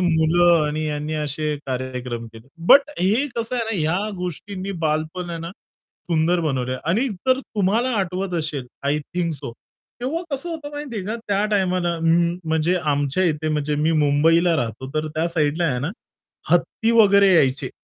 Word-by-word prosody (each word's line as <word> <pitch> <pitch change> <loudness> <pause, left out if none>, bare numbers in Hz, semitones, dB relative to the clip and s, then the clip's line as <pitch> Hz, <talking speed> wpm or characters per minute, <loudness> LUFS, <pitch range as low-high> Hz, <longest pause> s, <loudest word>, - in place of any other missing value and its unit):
मुलं 170 -1 +4
आणि 155 +1 -2
यांनी 150 +1 -3
असे 150 0 -2
कार्यक्रम 125 -2 -4
केले. 115 +2 -14 0.2
बट 280 +6 +7
हे 215 +10 +2
कसं 230 +1 -2
आहे 235 - 0
ना 225 -2 -2
या 180 +7 0
गोष्टींनी 185 +2 -5
बालपण 155 +3 -1
आहे 170 - -4
ना, 165 +1 -6
सुंदर 170 -2 -3
बनवलंय 130 -5 -1
आणि 210 - +1
जर 255 +6 0
तुम्हाला 220 +2 0
आठवत 185 0 -2
असेल 150 -5 -3 0.2
आय 145 +2 +1
थिंक 170 +3 -3
सो 125 -4 -7 0.5
तेव्हा 290 +8 -2
कसं 275 +5 -4
होतं 310 -3 -6
माहिती 290 -5 -6
आहे 195 - -3
का 220 +3 -2
त्या 200 0 +2
टाईमाला 180 -4 +1
म्हणजे 170 0 +1
आमच्या 145 0 0
इथे 155 -2 0
म्हणजे 150 -1 0
मी 160 +1 +2
मुंबईला 165 +4 +3
राहतो 120 -1 -3
तर 155 0 0
त्या 155 +2 -1
साइडला 160 0 0
आहे 130 -6 0
ना, 145 +6 -2 0.6
हत्ती 225 - +2
वगैरे 200 -3 +6
यायचे, 135 -4 +2
170 Hz, 165 wpm, -22 LUFS, 150-195 Hz, 0.6 s, बट